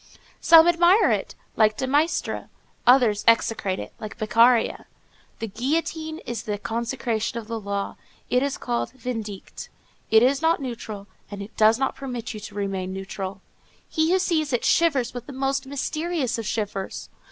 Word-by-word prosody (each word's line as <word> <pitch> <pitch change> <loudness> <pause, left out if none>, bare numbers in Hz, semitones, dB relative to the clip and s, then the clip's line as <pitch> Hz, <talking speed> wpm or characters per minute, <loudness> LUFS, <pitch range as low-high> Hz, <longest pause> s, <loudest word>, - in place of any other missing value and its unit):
Some 330 0 +7
admire 345 +4 +5
it, - - -2 0.2
like 215 -1 +3
de 265 - -1
Maistre; 290 +5 0 0.4
others 245 -5 +5
execrate 225 -4 +2
it, - - -7
like 215 0 -7
Beccaria. 230 +2 +3 0.5
The 225 - -4
guillotine 315 +7 -2
is 240 -1 -4
the 210 -1 -3
concretion 230 0 -2
of 230 - -5
the 230 0 -3
law; 200 -1 -4 0.3
it 250 - +2
is 280 0 -1
called 235 -1 -2
vindicate; 225 -6 -6 0.4
it 220 +1 +6
is 270 +3 +3
not 325 +1 +3
neutral, 225 -6 -6 0.2
and 200 -1 -6
it 210 - -12
does 220 +1 +5
not 270 - -1
permit 245 -4 -5
you 215 - -7
to 205 0 -10
remain 195 -2 -3
neutral. 190 0 -6 0.5
He 315 0 +1
who 375 - +4
sees 320 -5 0
it 245 - 0
shivers 280 -8 +2
with 245 -1 -7
the 285 - -8
most 270 0 -1
mysterious 290 -1 -2
of 225 - -4
shivers. 205 -3 -3
240 Hz, 165 wpm, -24 LUFS, 215-275 Hz, 0.5 s, Some